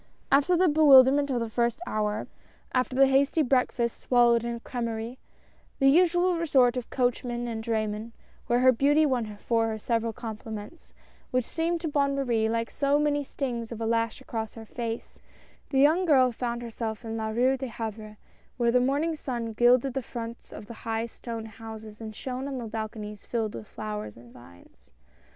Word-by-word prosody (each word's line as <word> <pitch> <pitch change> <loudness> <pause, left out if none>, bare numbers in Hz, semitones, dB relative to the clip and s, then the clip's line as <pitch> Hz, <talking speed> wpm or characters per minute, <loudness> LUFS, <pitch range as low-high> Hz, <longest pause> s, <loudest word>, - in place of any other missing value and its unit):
After 290 +6 +4
the 365 +1 +4
bewilderment 285 -2 +6
of 250 -3 0
the 230 - -2
first 235 +2 0
hour 210 -4 -1 0.2
— - - -31
after 255 0 0
the 270 +1 +6
hasty 275 +4 +3
breakfast 250 -3 0
swallowed 240 -2 +4
in 235 0 -2
a - - -7
crSmerie^ 235 0 -4 0.3
— - - -35
the 270 -1 +5
usual 350 +2 +3
resort 265 -7 +3
of 250 -2 -4
coachmen 245 -1 -1
and 225 -1 -4
draymen 220 0 -2 0.2
— - - -31
where 240 - +3
her 255 0 +7
beauty 290 +5 +3
won 235 -7 -1
for 225 +1 +1
her 220 -1 -3
several 230 +1 -1
compliments, 220 +5 -8 0.4
which 255 -2 0
seemed 335 +1 -1
to 335 - -2
Bonne 280 -2 +1
Marie 235 -5 +1
like 230 0 -1
so 280 0 +2
many 295 -1 +1
stings 245 -4 -4
of 230 - -6
a 225 - -2
lash 230 0 0
across 220 -2 -5
her 225 -1 -9
face 230 0 -6 0.3
— - - -32
the 270 - -1
young 310 +7 +4
girl 260 -6 +5
found 240 0 -3
herself 230 -1 -5
in 225 0 -4
La 220 -1 -2
Rue 250 +4 +2
de 265 0 -5
Havre, 220 -2 -6 0.4
where 235 -1 +2
the 250 - +4
morning 285 +6 +1
sun 235 -6 -4
gilded 245 +3 +4
the 270 - -1
fronts 230 -1 -8
of - - -9
the 235 - -9
high 225 0 -2
stone 230 -1 -7
houses 220 0 -10
and 215 -1 -7
shone 260 +3 -5
on 275 -2 -4
the 240 - -5
balconies 215 -1 -6
filled 225 -3 -2
with 110 - -8
flowers 105 0 -6
and 120 0 -15
vines. 90 -8 -18
235 Hz, 190 wpm, -27 LUFS, 225-270 Hz, 0.4 s, her